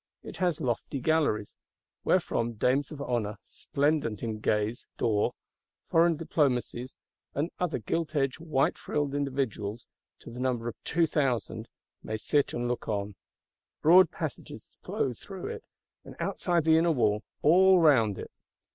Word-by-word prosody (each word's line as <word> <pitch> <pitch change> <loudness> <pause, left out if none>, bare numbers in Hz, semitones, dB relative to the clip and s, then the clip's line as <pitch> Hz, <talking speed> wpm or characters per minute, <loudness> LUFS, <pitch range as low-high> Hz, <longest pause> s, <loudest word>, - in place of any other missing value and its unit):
It - - -9
has 180 -4 +1
lofty 125 +3 -2
galleries; 140 -8 +1 0.5
wherefrom 115 0 +1
dames 130 +7 +1
of 145 -2 -6
honour, 115 -6 -2
splendent 140 -7 -1
in 110 -2 -3
gaze 105 +2 -1
d'or; 105 -3 +1 0.6
foreign 165 -1 +4
Diplomacies, 130 -5 -1 0.4
and 150 +5 -1
other 180 -3 0
gilt 155 +8 -2
edged 135 -1 0
white 150 -4 0
frilled 145 -2 -2
individuals 130 -6 -2 0.4
to - - -10
the 120 - -8
number 125 -2 -1
of 120 - -7
two 165 +1 +2
thousand,—may 125 -6 -3
sit 145 +6 +1
and 120 0 -2
look. 120 0 -3 1.0
Broad 180 +4 +7
passages - - -7
flow - - -1
through - - -9
it; 455 -1 -6 0.4
and, - - -11
outside 175 -3 0
the 160 0 +5
inner 170 +1 +3
wall, 105 -7 +2 0.2
all 185 +5 +6
round 125 - +4
it. - - -8
135 Hz, 140 wpm, -29 LUFS, 115-160 Hz, 1.0 s, Broad